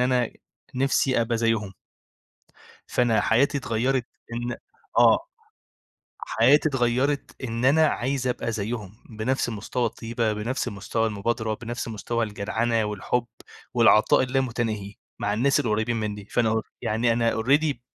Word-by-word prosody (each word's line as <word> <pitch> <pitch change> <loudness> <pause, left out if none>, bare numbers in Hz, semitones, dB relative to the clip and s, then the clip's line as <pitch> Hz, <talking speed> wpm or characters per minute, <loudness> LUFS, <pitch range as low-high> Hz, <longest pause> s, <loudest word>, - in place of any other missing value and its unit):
أنا 125 -2 +2 0.4
نِفسي 130 -1 +2
أبقى 115 0 0
زيّهم. 115 -4 0 1.1
فأنا 120 -3 +2
حياتي 140 +5 +2
اتغَّيرِت، 125 0 0 0.3
إن 120 +1 -3 0.4
آه. - - +7 1.1
حياتي 135 +7 +4
اتغيَّرِت، 135 +2 0
إن 115 0 -3
أنا 155 +4 +5
عايز 130 -1 -1
أبقى 120 -1 -1
زيّهم، 105 -2 -4 0.2
بنفس 115 +4 -1
مستوى 115 +2 -2
الطيبة، 115 0 -2
بنفس 115 +5 -2
مستوى 110 +1 -2
المبادرة، 110 +1 -1
بنفس 120 +2 -5
مستوى 115 +2 -2
الجدعنة 110 +2 -1
والحب 105 +4 -1 0.5
والعطاء 110 - +5
اللامتناهي، 120 -6 -2 0.2
مع 105 0 -1
الناس 140 +6 +2
القريِّبين 110 -2 0
منّي، 105 -2 -3
فأنا 115 +2 +1
أ 110 0 0 0.2
يعني 115 +2 +1
أنا 115 -1 +1
already 145 +5 +3
ب 125 - -19
115 Hz, 125 wpm, -25 LUFS, 110-125 Hz, 1.1 s, آه